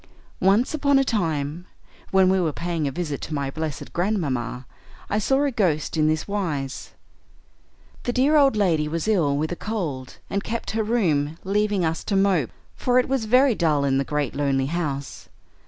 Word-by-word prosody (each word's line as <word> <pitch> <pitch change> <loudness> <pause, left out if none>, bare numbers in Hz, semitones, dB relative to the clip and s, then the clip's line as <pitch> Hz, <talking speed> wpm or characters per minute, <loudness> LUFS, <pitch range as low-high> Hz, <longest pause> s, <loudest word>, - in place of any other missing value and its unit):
"Once 200 +9 +3
upon 280 -2 +3
a 270 - +4
time, 165 - -2 0.4
when 190 -1 +4
we 190 +1 +3
were 165 -3 +1
paying 170 -1 -2
a - - -2
visit 150 -2 -4
to 155 - -4
my 140 -1 -2
blessed 155 -1 -5
grandmamma, 140 - -1 0.5
I 210 - +2
saw 270 +6 +2
a 285 - +1
ghost 170 - 0
in 155 -1 +3
this 155 0 0
wise: 160 -10 -3 1.1
The 245 - +1
dear 265 +5 +3
old 275 -5 +5
lady 170 -7 +2
was 165 +5 -3
ill 165 -10 +2
with 155 +3 -1
a - - -2
cold 165 - -4
and 200 0 -2
kept 230 +1 -4
her 220 - 0
room, 160 -10 0
leaving 205 -1 +1
us 160 0 -2
to 205 - -1
mope, 195 - +2 0.3
for 250 0 +1
it 255 - +3
was 260 -4 0
very 250 +3 +4
dull 155 -7 +1
in 135 -1 +2
the - - +1
great 145 -3 -2
lonely 140 -2 0
house. 140 -5 -4
175 Hz, 185 wpm, -24 LUFS, 145-215 Hz, 1.1 s, old